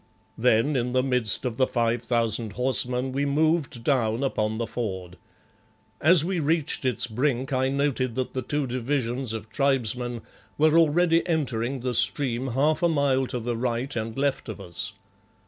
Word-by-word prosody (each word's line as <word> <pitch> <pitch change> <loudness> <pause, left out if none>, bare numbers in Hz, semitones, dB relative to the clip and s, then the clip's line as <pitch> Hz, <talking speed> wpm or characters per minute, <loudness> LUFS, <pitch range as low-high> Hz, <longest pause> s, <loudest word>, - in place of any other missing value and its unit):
Then, 120 +4 +2
in 125 -1 -1
the 130 0 +2
midst 125 -3 +3
of 120 -2 -3
the 130 - +3
five 115 -1 0
thousand 115 -2 0
horsemen, 125 +1 0
we 140 +2 -1
moved 150 -3 0
down 115 -2 +1
upon 110 -5 -1
the 115 - -2
ford. 95 -7 -5 0.9
As 165 0 +5
we 185 -1 -1
reached 155 -2 0
its 125 -3 +1
brink 130 +3 -1
I 130 0 +1
noted 135 -3 -1
that 130 -1 -3
the 130 - -2
two 145 +2 -2
divisions 125 -1 -2
of 110 -1 -6
tribesmen 125 -3 0 0.4
were 155 +1 +4
already 165 +1 +4
entering 130 -6 -1
the 125 0 -2
stream 120 +2 +2
half 145 +5 +1
a 170 - +3
mile 140 -4 +1
to 125 - -3
the 120 +1 -3
right 120 +3 -2
and 115 0 -4
left 140 -3 -1
of 110 - -6
us. 85 -2 -5
130 Hz, 165 wpm, -25 LUFS, 115-140 Hz, 0.9 s, As